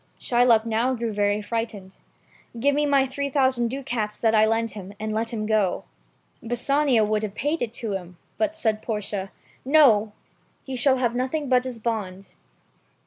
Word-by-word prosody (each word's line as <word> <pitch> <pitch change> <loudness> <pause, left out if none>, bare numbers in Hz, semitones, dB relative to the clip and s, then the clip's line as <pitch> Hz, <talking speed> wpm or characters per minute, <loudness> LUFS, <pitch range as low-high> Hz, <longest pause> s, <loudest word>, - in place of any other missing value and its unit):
Shylock 240 -2 +3
now 230 +3 +1
grew 230 -2 -3
very 205 0 0
frightened. 215 -4 -4 0.6
"Give 285 +4 +3
me 295 +1 +1
back - - -1
my 275 -1 +4
three 280 +2 -3
thou 265 -1 +3
sand 240 -2 -1
ducats 240 -5 -3
that 225 -1 +1
I 215 0 +5
lent 225 0 0
him, 200 -1 -9
and 215 0 -3
let 225 +1 -1
him 215 -2 -3
go." 210 -4 +1 0.6
Bassanio 245 0 +2
would 210 0 0
have 210 -2 -5
paid 295 +5 -1
it 240 -3 -2
to 225 -4 -4
him, 180 -2 -6 0.2
but 320 -1 0
said 220 -9 0
Portia. 205 -3 -4 0.3
"No! 250 -8 +4 0.5
He 265 - -6
shall 260 +2 +3
have 240 -2 0
nothing 260 +3 -2
but 250 -1 +3
his 250 -3 -6
bond." 200 -4 -4
230 Hz, 180 wpm, -24 LUFS, 215-260 Hz, 0.6 s, I